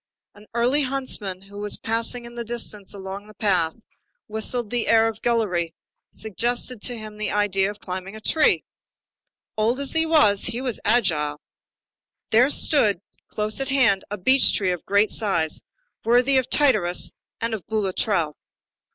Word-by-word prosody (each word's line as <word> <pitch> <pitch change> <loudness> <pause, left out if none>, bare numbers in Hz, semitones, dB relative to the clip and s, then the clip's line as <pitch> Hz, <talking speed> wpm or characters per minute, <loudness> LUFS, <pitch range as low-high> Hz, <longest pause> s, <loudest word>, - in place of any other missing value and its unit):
An 210 +1 -17
early 250 +5 +2
huntsman 255 -9 -1
who 200 +1 -11
was 205 0 0
passing 230 +2 -2
in 235 - -9
the 240 0 -4
distance 225 -4 -5
along 195 +2 -8
a 215 - -14
path, 180 -7 +1 0.5
whistling 220 +1 -2
the 240 0 -1
air 225 0 +5
of 220 -1 -5
Guillery, 180 -8 0 0.3
suggested 240 +2 -2
to 245 -1 -1
him 215 -1 -9
the 215 - -2
idea 200 -2 +1
of 205 0 -8
climbing 185 +2 -6
a - - -8
tree. 305 +8 +2 0.9
Old 225 +4 +1
as 280 -1 0
he 320 0 +3
was, 210 -11 +4
he 235 0 -2
was 255 -4 -2
agile. 160 -10 +1 0.9
There 240 +5 +5
stood 220 - +3 0.3
close 215 +2 -1
at 270 - +1
hand 250 -8 +3
a 205 - -4
beech 260 +8 +4
tree 190 -3 0
of 180 -2 -4
great 200 +2 +3
size, 170 -8 0 0.4
worthy 250 +3 +4
of 255 - -4
Tityrus 215 -12 +3 0.3
and 230 0 -1
of 210 -5 -4
Boulatruelle. 195 -6 0
215 Hz, 160 wpm, -23 LUFS, 195-240 Hz, 0.9 s, air